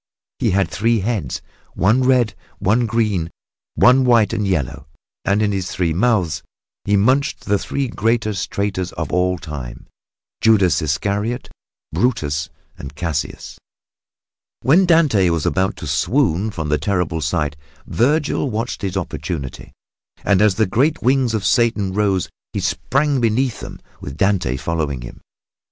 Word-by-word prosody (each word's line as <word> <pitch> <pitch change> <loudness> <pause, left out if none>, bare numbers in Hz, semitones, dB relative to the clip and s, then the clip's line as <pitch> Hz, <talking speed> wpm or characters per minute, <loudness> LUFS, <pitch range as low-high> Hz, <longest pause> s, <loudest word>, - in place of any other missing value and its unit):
He - - +1
had 95 +1 +2
three 115 +1 +1
heads, 100 - -2 0.3
one 105 +9 +3
red, 125 -4 +3 0.2
one 110 +5 +1
green 110 -5 +1
and - - -10 0.5
one 130 +1 +5
white 120 -4 +4
and 105 -2 -1
yellow; 80 -10 -2 0.4
and 100 +2 +2
in 105 - +1
his 95 -3 -2
three 85 -3 -1
mouths 95 -3 +1 0.4
he 100 0 +3
munched 130 +8 +2
the 100 -1 0
three 140 -1 -2
greatest 110 -3 -1
traitors 95 -3 -2
of - - -4
all 90 0 +2
time 75 -7 -8 0.6
Judas 105 -6 +4
Iscariot, 100 - -2 0.4
Brutus 80 - 0 0.3
and 70 +1 -8
Cassius. 85 -2 -4 1.0
When 180 +8 +4
Dante 145 - +4
was 85 -3 -1
about 95 +2 +1
to - - -8
swoon 95 - +1
from 80 -7 -4
the 75 - +1
terrible 90 -5 -1
sight, 75 -1 -1 0.3
Vergil 145 +3 +1
watched 115 +1 -3
his 95 -1 -2
opportunity, 80 -6 -5 0.5
and 100 -1 +3
as 105 -3 +4
the 110 - +2
great 140 - +1
wings 130 -2 +2
of 105 - -2
Satan 110 -6 +2
rose 100 -3 +1 0.3
he - - -1
sprang 140 0 0
beneath 115 +1 +1
them, - - -9 0.2
with 70 0 -7
Dante 95 -10 +1
following 75 -4 -2
him. - - -10
100 Hz, 145 wpm, -20 LUFS, 85-120 Hz, 1.0 s, one